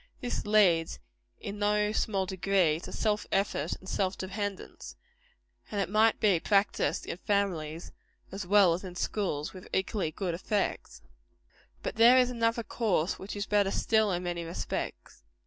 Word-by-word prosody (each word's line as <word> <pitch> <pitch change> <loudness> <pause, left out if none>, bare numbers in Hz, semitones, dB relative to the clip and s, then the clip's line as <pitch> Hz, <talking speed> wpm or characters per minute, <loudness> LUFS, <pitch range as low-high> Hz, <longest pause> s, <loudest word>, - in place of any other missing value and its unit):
This 245 -3 -4
leads, 185 -6 +3 0.4
in 205 +1 -6
no 210 0 +2
small 200 -3 0
degree, 185 -4 +1
to - - -9
self 210 -1 -1
effort 195 -6 0
and 190 - -15
self 190 0 -1
dependence; 200 +1 -5 0.7
and 200 -2 -2
might 220 +1 +3
be 200 -6 +3
practised 200 +3 +1
in - - -5
families 175 -6 -2 0.4
as 195 -1 -6
well 195 -3 +5
as 175 - -4
in 180 -2 -8
schools, 175 -7 -2
with 185 -1 -11
equally 190 -2 -1
good 175 +2 -3
effects. 185 - -3 0.8
But - - -4
there 235 +3 +7
is 250 -1 +4
another 230 -1 0
course 200 -8 -1
which 195 +2 -7
is 205 0 -3
better 205 -2 +2
still, 220 +1 +2
in 180 0 -2
many 175 -1 -3
respects. 165 +1 -5
195 Hz, 150 wpm, -29 LUFS, 180-210 Hz, 0.8 s, there